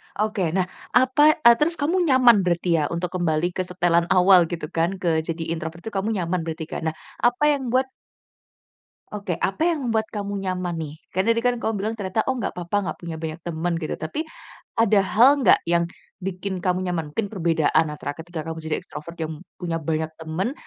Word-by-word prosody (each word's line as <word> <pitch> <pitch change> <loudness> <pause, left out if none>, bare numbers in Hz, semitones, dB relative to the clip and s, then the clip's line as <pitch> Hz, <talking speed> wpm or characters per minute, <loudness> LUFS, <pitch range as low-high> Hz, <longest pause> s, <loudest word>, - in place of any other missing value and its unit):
Oke, 210 -4 0
nah 190 - +3 0.3
apa 260 +5 +5
eee, 235 -1 +9
terus 330 +3 +3
kamu 335 +5 0
nyaman 250 -5 +6
berarti 175 -2 +1
ya 150 - +1
untuk 170 +2 -3
kembali 170 0 +1
ke 185 +1 -3
setelan 175 -1 +2
awal 180 -2 +6
gitu 165 -3 -5
kan, 170 +3 0
ke 170 -4 +1
jadi 165 0 -3
introvert 165 +1 -5
itu 220 - -5
kamu 205 +3 -1
nyaman 180 -1 -1
berarti 160 0 -4
kan? - - -4
Nah 160 - -2 0.2
apa 245 +4 +2
yang 270 -3 -1
membuat 260 +2 +1 1.2
Oke, 200 -5 -3
apa 315 - +1
yang 305 -6 -1
membuat 220 -2 0
kamu 205 -1 -4
nyaman 185 -2 -2
nih? 155 0 -7 0.2
Kan 190 +5 +1
tadi 230 - +3
kan 245 - +4
kamu 225 - 0
bilang 210 +3 -2
ternyata 205 0 -2
oh 265 - +1
nggak - - -4
apa-apa 175 +3 -1
nggak - - -5
punya 170 -2 -6
banyak 160 0 -4
temen 170 +1 -2
gitu 160 -2 -3
tapi, 230 - -4 0.5
ada 220 -2 +5
hal 230 +7 +6 0.2
nggak - - +7
yang 170 0 +3 0.4
bikin 190 +1 -3
kamu 180 -1 +1
nyaman? 160 -4 -3
Mungkin 205 -3 -1
perbedaan 165 -5 +2
antara 145 -1 -5
ketika 165 0 -6
kamu 160 - -4
jadi 155 -1 0
extrovert 165 +3 -9
yang 160 0 -4 0.2
punya 170 -2 -1
banyak 160 0 -2
temen, 165 +9 -3
180 Hz, 195 wpm, -23 LUFS, 165-220 Hz, 1.2 s, eee